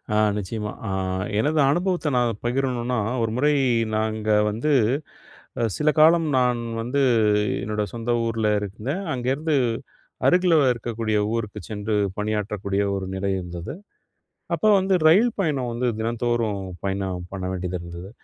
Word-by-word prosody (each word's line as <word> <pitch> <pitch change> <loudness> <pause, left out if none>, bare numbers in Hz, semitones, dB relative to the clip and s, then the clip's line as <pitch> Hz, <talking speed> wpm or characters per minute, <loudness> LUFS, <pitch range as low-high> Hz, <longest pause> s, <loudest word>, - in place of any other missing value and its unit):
ஆ - - +3 0.2
நிச்சயமா 105 +1 -4 0.2
ஆ - - -2 0.5
எனது 150 +5 +1
அனுபவத்த 175 0 0
நான் 120 -1 +2
பகிரணுனா, 125 -1 -1 0.2
ஒரு 115 -1 0
முறை 150 +3 +3 0.4
நாங்க 110 0 -1 0.2
வந்து 115 +9 -1 1.1
சில 150 0 +2
காலம், 165 +1 +6
நான் 125 -1 +2 0.2
வந்து 135 +4 0 0.6
என்னோட 105 0 -1
சொந்த 115 0 -3
ஊர்ல 115 -1 0
இருந்தேன். 110 - -4
அங்கேருந்து 135 +5 -1 0.7
அருகில 180 -1 +4 0.2
இருக்கக்கூடிய 115 -2 -2 0.2
ஊருக்கு 105 -2 -4
சென்று, 105 0 -2 0.2
பணியாற்றக்கூடிய 105 -1 -1
ஒரு 95 - -3
நிலை 100 +1 -1
இருந்தது. 90 -1 -6 0.8
அப்போ 215 - +2
வந்து 190 0 +1
ரயில் 220 +9 +5
பயணம் 140 -8 0
வந்து, 120 +2 -1
தினந்தோறும் 115 -2 -1 0.2
பயணம் 95 -2 -2
பண்ண 95 -1 -5
வேண்டியது 90 0 -3
இருந்தது. 85 +2 -9
115 Hz, 125 wpm, -24 LUFS, 105-140 Hz, 1.1 s, காலம்